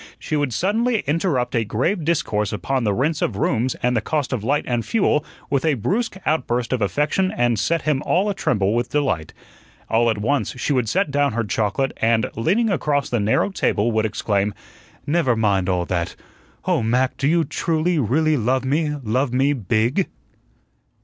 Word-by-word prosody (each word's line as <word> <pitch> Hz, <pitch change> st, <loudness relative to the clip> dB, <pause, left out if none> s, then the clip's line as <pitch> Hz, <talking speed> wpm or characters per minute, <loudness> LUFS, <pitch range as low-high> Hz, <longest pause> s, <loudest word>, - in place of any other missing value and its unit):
She 155 Hz, -, -3 dB
would 145 Hz, -3 st, 0 dB
suddenly 220 Hz, -, +1 dB
interrupt 145 Hz, -4 st, 0 dB
a 115 Hz, -, +2 dB
grave 145 Hz, -, -1 dB
discourse 110 Hz, -, 0 dB
upon 120 Hz, +5 st, -1 dB
the 105 Hz, -, +2 dB
rents 150 Hz, +6 st, 0 dB
of 105 Hz, -, 0 dB
rooms 120 Hz, +3 st, 0 dB
and 125 Hz, 0 st, +2 dB
the 115 Hz, -, +1 dB
cost 145 Hz, +3 st, -2 dB
of 115 Hz, -5 st, -2 dB
light 140 Hz, +5 st, +1 dB
and 120 Hz, -2 st, 0 dB
fuel 190 Hz, -, +1 dB, 0.3 s
with 140 Hz, -2 st, +1 dB
a 155 Hz, -3 st, +2 dB
brusque 190 Hz, -, -1 dB
outburst 125 Hz, -5 st, 0 dB
of 125 Hz, -, -1 dB
affection 150 Hz, -, +1 dB
that 120 Hz, -3 st, +2 dB
set 165 Hz, +9 st, 0 dB
him 150 Hz, -3 st, +1 dB
all 185 Hz, +4 st, +1 dB
a 205 Hz, -, 0 dB
tremble 105 Hz, -, 0 dB
with 120 Hz, 0 st, 0 dB
delight. 130 Hz, -, -1 dB, 0.6 s
All 115 Hz, +1 st, +3 dB
at 110 Hz, -, 0 dB
once 135 Hz, +8 st, -1 dB
she 145 Hz, -, 0 dB
would 125 Hz, -5 st, 0 dB
set 190 Hz, -4 st, +1 dB
down 140 Hz, -2 st, +1 dB
her 115 Hz, +1 st, 0 dB
chocolate, 110 Hz, +5 st, 0 dB
and, 115 Hz, -1 st, +1 dB
leaning 200 Hz, -, +1 dB
across 145 Hz, -6 st, 0 dB
the 120 Hz, -, +1 dB
narrow 105 Hz, -, +1 dB
table, 115 Hz, -, +1 dB
would 110 Hz, 0 st, +1 dB
exclaim: 100 Hz, -1 st, -1 dB, 0.5 s
"Never 145 Hz, -5 st, +2 dB
mind 100 Hz, -4 st, +1 dB
all 90 Hz, -1 st, 0 dB
that! 85 Hz, -1 st, -2 dB, 0.5 s
Oh, -, -, +2 dB
Mac, 125 Hz, +4 st, +1 dB
do 140 Hz, -, 0 dB
you 165 Hz, +2 st, +3 dB
truly, 165 Hz, +1 st, 0 dB
really 150 Hz, +6 st, +2 dB
love 130 Hz, +3 st, 0 dB
me 150 Hz, +2 st, 0 dB
love 125 Hz, +4 st, 0 dB
me 135 Hz, +3 st, +2 dB
BIG?" 120 Hz, -, 0 dB
130 Hz, 185 wpm, -21 LUFS, 110-155 Hz, 0.6 s, All